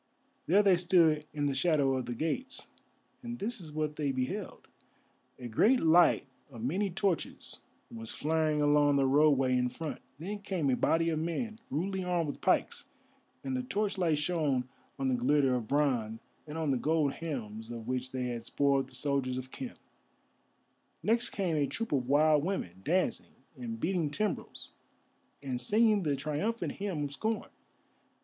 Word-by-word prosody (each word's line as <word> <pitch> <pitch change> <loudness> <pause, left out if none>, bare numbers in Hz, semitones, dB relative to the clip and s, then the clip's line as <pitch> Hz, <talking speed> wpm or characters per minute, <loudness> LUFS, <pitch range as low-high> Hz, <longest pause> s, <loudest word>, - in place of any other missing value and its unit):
There 200 +5 +5
they 190 -3 +5
stood 170 -4 +3
in 145 -1 -2
the 140 - +1
shadow 140 -2 +2
of 130 - -3
the 120 - -3
gates, 240 - -3 0.6
and 240 -1 -6
this 225 +1 -4
is 160 -3 -9
what 150 0 -2
they 145 -3 0
beheld. 135 +11 -4 0.7
A 125 - -7
great 220 - +4
light 165 -1 +5 0.2
of 115 -5 -9
many 190 +11 0
torches 190 -1 -2 0.3
was 115 -1 -7
flaring 155 -1 +1
along 145 -1 +4
the 140 -1 +3
roadway 135 -2 +4
in 125 0 +1
front. 155 +3 -6 0.2
Then 195 +7 -5
came 185 -9 -1
a - - +3
body 165 +5 +2
of 155 - -1
men, 215 +8 -3
rudely 190 +6 -2
armed 175 -4 0
with - - -14
pikes, - - +1 0.6
and 135 -1 -2
the 125 - 0
torchlight 185 +1 0
shone 150 -5 0 0.3
on 135 -1 -1
the 130 - +2
glitter 135 +2 +3
of 120 -3 -2
bronze 125 -6 +1 0.3
and 150 +1 -6
on 160 -3 0
the 130 - +2
gold 150 0 +1
helms 115 -9 -5
of 115 -1 -7
which 130 0 -2
they 125 -1 -2
had 120 -1 -4
spoiled 135 +2 +1
the 130 - -13
soldiers 130 -1 -1
of 130 0 -6
Khem. 260 -2 -6 1.3
Next 230 +2 +2
came 185 -5 -1
a 145 -1 +2
troop 230 +8 -4
of 130 -3 0
wild 150 +1 +4
women, 95 - -3
dancing, 180 +4 0 0.2
and 115 -4 -6
beating 170 -1 0
timbrels, 205 +7 -3 0.7
and 125 -3 -2
singing 215 - +4
the 150 -5 0
triumphant 155 +12 -2
hymn 195 -7 -3
of 145 - -3
scorn. 220 +9 -3
150 Hz, 170 wpm, -31 LUFS, 130-180 Hz, 1.3 s, There